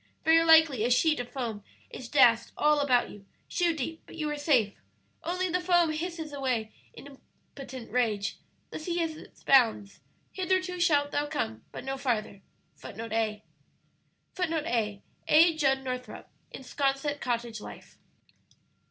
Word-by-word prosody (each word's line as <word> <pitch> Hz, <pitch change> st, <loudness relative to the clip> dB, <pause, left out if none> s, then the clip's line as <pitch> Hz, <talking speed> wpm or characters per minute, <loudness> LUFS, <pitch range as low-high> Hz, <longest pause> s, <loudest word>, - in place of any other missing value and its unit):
Very 325 Hz, +1 st, +5 dB
likely 320 Hz, -7 st, +5 dB
a 240 Hz, -, +1 dB
sheet 305 Hz, +5 st, +3 dB
of 245 Hz, 0 st, -5 dB
foam 230 Hz, -6 st, -5 dB, 0.3 s
is 245 Hz, -2 st, -8 dB
dashed 235 Hz, -5 st, +4 dB
all 300 Hz, -1 st, +3 dB
around 250 Hz, -3 st, +2 dB
you, 200 Hz, -1 st, -15 dB, 0.2 s
shoe 350 Hz, -2 st, +1 dB
deep, 315 Hz, +3 st, -5 dB
but -, -, -12 dB
you 310 Hz, -2 st, -3 dB
are -, -, -2 dB
safe 265 Hz, -9 st, +2 dB, 0.5 s
only 365 Hz, +3 st, -1 dB
the 360 Hz, +1 st, -1 dB
foam 350 Hz, -2 st, +3 dB
hisses 320 Hz, -1 st, -5 dB
away 250 Hz, -6 st, -2 dB, 0.2 s
in 280 Hz, -1 st, -13 dB, 0.4 s
impotent 260 Hz, -4 st, -9 dB
rage. 220 Hz, -5 st, 0 dB, 0.3 s
The -, -, -6 dB
sea 345 Hz, +2 st, -3 dB
has 325 Hz, -2 st, -1 dB
its -, -, -15 dB
bounds; 225 Hz, -7 st, +3 dB, 0.3 s
'hitherto 370 Hz, -1 st, -1 dB
shalt 290 Hz, -4 st, +2 dB
thou 290 Hz, 0 st, -1 dB
come, 110 Hz, -, -4 dB
but -, -, -8 dB
no 270 Hz, 0 st, -4 dB
farther.'"[A] 215 Hz, -6 st, -2 dB, 0.4 s
[Footnote 225 Hz, +1 st, -8 dB, 1.5 s
A: 210 Hz, -8 st, -2 dB, 0.2 s
A. 330 Hz, +2 st, +6 dB
Judd 270 Hz, -3 st, +1 dB
Northrup, 250 Hz, -1 st, -6 dB, 0.2 s
in -, -, -10 dB
"Sconset 275 Hz, +2 st, -1 dB
Cottage 235 Hz, -3 st, -3 dB
Life." -, -, -12 dB
275 Hz, 145 wpm, -28 LUFS, 240-320 Hz, 1.5 s, A